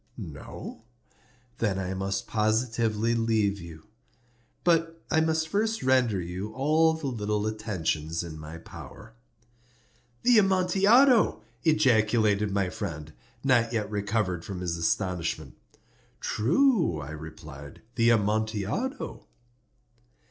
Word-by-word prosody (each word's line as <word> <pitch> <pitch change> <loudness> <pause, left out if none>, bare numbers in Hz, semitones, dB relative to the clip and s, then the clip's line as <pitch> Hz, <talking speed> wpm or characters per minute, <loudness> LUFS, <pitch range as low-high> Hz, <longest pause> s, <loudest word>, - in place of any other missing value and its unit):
No? 110 - -8 0.8
Then 105 -4 0
I 95 -1 -3
must 95 +1 -2
positively 110 0 +1
leave 110 -3 +1
you. 85 -2 -11 0.8
But 165 -1 +2
I 160 -2 +4
must 160 0 +1
first 220 +5 -1
render 130 -6 +3
you 90 +4 -5
all 155 +5 +3
the 160 -2 -7
little 105 -5 -1
attentions 85 -7 -2
in 80 -2 -8
my 75 +2 -8
power." 110 +6 -12 1.1
"The 240 -3 +6
Amontillado!" 195 - +4 0.2
ejaculated 110 -9 +3
my 100 -2 0
friend, 80 -6 -6 0.3
not 120 -3 +3
yet 105 -2 -2
recovered 100 -4 -1
from 95 -1 -6
his 85 -2 -2
astonishment. 85 0 -2 0.6
"True," 170 - +2
I 75 +1 -7
replied; 75 -2 -10
"the 115 -1 +3
Amontillado." 110 - -1
110 Hz, 105 wpm, -27 LUFS, 95-150 Hz, 1.1 s, The